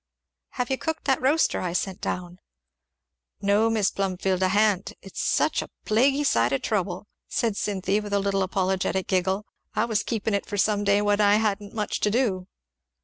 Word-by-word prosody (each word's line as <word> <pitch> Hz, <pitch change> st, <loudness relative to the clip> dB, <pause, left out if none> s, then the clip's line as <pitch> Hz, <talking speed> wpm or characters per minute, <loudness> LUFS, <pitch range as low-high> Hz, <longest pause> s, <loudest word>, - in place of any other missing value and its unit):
"Have 250 Hz, +1 st, -2 dB
you 265 Hz, -, 0 dB
cooked 320 Hz, 0 st, -3 dB
that 265 Hz, -2 st, +2 dB
roaster 290 Hz, +5 st, +2 dB
I 180 Hz, -2 st, -2 dB
sent 190 Hz, +1 st, -2 dB
down?" 180 Hz, 0 st, -4 dB, 1.0 s
"No, 205 Hz, +3 st, +3 dB
Mis' 215 Hz, -3 st, +1 dB
Plumfield, 190 Hz, -1 st, -1 dB
I 185 Hz, -, +4 dB
ha'n't 205 Hz, 0 st, +2 dB
it's 195 Hz, -, -6 dB
such -, -, +1 dB
a -, -, -8 dB, 0.2 s
plaguy 270 Hz, +6 st, +3 dB
sight 120 Hz, -, +2 dB
of 135 Hz, -, -1 dB
trouble!" 190 Hz, -3 st, -1 dB, 0.2 s
said 225 Hz, -3 st, -1 dB
Cynthy 200 Hz, 0 st, 0 dB
with 210 Hz, -1 st, -7 dB
a 200 Hz, -, +3 dB
little 195 Hz, 0 st, 0 dB
apologetic 190 Hz, 0 st, 0 dB
giggle; 190 Hz, +2 st, 0 dB, 0.3 s
"I 220 Hz, -, +2 dB
was 220 Hz, -3 st, 0 dB
keepin' 220 Hz, -2 st, -2 dB
it 200 Hz, -, -1 dB
for 205 Hz, -, -4 dB
some 205 Hz, +1 st, +2 dB
day 200 Hz, 0 st, +3 dB
when 205 Hz, 0 st, +2 dB
I 205 Hz, 0 st, +5 dB
hadn't 210 Hz, -1 st, -1 dB
much 210 Hz, -2 st, -2 dB
to 210 Hz, -, +2 dB
do." 205 Hz, -6 st, 0 dB
200 Hz, 185 wpm, -25 LUFS, 190-215 Hz, 1.0 s, I